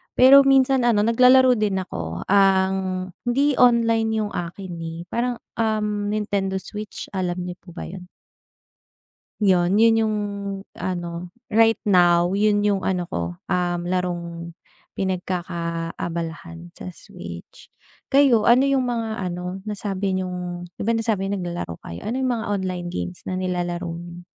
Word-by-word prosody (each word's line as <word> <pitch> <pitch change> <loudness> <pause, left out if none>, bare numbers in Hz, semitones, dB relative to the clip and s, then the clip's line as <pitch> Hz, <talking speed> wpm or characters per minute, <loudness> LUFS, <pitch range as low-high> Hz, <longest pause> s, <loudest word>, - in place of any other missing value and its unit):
pero 275 +2 +8
minsan 265 -2 +4
ano, 210 -3 +3
naglalaro 250 +1 +5
din 205 -2 +1
ako. 85 - -5
Ang 190 -1 +2 0.2
hindi 275 +3 +2
online 230 -2 +4
yung 205 - -4
akin, 175 +2 -5
eh, 165 0 -6
parang, 245 +1 0 0.2
um, 210 -2 0
Nintendo 205 -2 -1
Switch. 210 +2 -7
Alam 180 -2 -2
niyo 180 0 -7
po 175 -2 -15
ba - - -6
'yon? 180 0 -9 1.4
'Yon 185 -1 +3
'yon 225 +1 +5
yung 215 -1 +1 0.6
ano, 175 -1 -4 0.2
right 225 +1 +5
now, 175 -2 +4
'yon 205 +1 +2
yung 200 -2 +1
ano 180 -2 0
ko, 85 0 -3 0.2
um, 175 -1 0
larong 170 -2 -3 0.4
pinagkakaabalahan, 170 -2 -4
sa 185 - -10
switch. - - -11 0.4
Kayo, 270 -6 +4
ano 245 +3 +6
yung 270 -2 +2
mga 225 -2 -2
ano, 180 +2 -5
nasabi 195 -2 -2
niyong 180 -1 -4
di - - -11
ba 230 - +3
nasabi 215 -4 0
niyo 200 - -1
naglalaro 175 - -4
kayo? 85 - -7
Ano 235 - -2
yung 260 -1 0
mga 225 -2 -2
online 185 -3 -2
games 90 - -5
na 185 - -2
nilalaro 175 -1 -2
niyo? 175 +1 -9
190 Hz, 140 wpm, -23 LUFS, 175-220 Hz, 1.4 s, pero